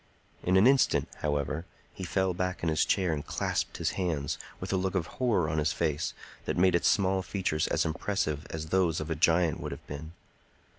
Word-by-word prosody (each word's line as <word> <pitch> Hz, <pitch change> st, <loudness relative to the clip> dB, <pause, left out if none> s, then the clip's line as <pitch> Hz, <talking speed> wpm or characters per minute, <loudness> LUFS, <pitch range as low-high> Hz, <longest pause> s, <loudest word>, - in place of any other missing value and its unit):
In 90 Hz, +1 st, +3 dB
an 95 Hz, -, +6 dB
instant, 135 Hz, +1 st, +4 dB
however, 75 Hz, +2 st, -2 dB, 0.3 s
he 95 Hz, -, -7 dB
fell 95 Hz, +1 st, +1 dB
back 90 Hz, 0 st, -2 dB
in 85 Hz, -, +2 dB
his 80 Hz, -, +2 dB
chair 90 Hz, -4 st, +1 dB
and 75 Hz, -2 st, -3 dB
clasped -, -, -2 dB
his -, -, 0 dB
hands, 80 Hz, -7 st, -2 dB, 0.2 s
with -, -, -3 dB
a -, -, +3 dB
look 95 Hz, 0 st, -1 dB
of 90 Hz, -3 st, +1 dB
horror 110 Hz, -6 st, 0 dB
on 75 Hz, 0 st, 0 dB
his 75 Hz, 0 st, +1 dB
face 80 Hz, -1 st, -1 dB, 0.3 s
that -, -, -2 dB
made 90 Hz, +1 st, +4 dB
its 85 Hz, -, +3 dB
small 95 Hz, -4 st, +3 dB
features 95 Hz, -5 st, -1 dB
as -, -, +1 dB
impressive 80 Hz, -3 st, -1 dB
as 80 Hz, -1 st, -5 dB
those 90 Hz, -3 st, +2 dB
of 80 Hz, +1 st, -4 dB
a -, -, +1 dB
giant 80 Hz, +1 st, +3 dB
would -, -, -5 dB
have -, -, -8 dB
been. 75 Hz, +3 st, -7 dB
85 Hz, 205 wpm, -29 LUFS, 75-95 Hz, 0.3 s, an